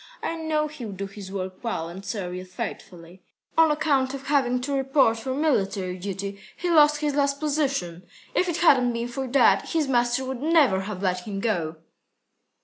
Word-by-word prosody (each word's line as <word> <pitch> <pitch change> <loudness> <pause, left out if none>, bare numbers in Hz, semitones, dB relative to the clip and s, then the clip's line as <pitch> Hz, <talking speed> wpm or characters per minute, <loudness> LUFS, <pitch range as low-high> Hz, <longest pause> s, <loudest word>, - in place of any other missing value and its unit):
I 330 - -2
know 315 -2 0
he'll 250 -9 -7
do 195 +1 -4
his 195 -1 -9
work 185 0 -5
well 220 -8 -2
and 180 +3 -9
serve 195 -3 -4
you 180 0 -5
faithfully. 180 -1 -8 0.3
On 325 -1 +6
account 285 -3 +1
of 275 0 -9
having 260 -4 +2
to 280 +3 -3
report 270 -4 +3
for 260 +3 -3
military 195 -11 0
duty, 200 +1 -5 0.2
he 350 0 -1
lost 300 -2 +5
his 295 -1 0
last 280 0 +1
position. 275 - -1 0.3
If 365 - +1
it 340 - -1
hadn't 255 -8 +4
been 235 +1 -3
for 265 +2 -4
that, 270 +2 +3
his 315 -3 +1
master 245 0 +1
would 260 -1 -5
never 295 - +4
have 200 -2 -5
let 180 0 -1
him 200 -2 -4
go." 175 -8 -1
245 Hz, 185 wpm, -25 LUFS, 195-290 Hz, 0.3 s, On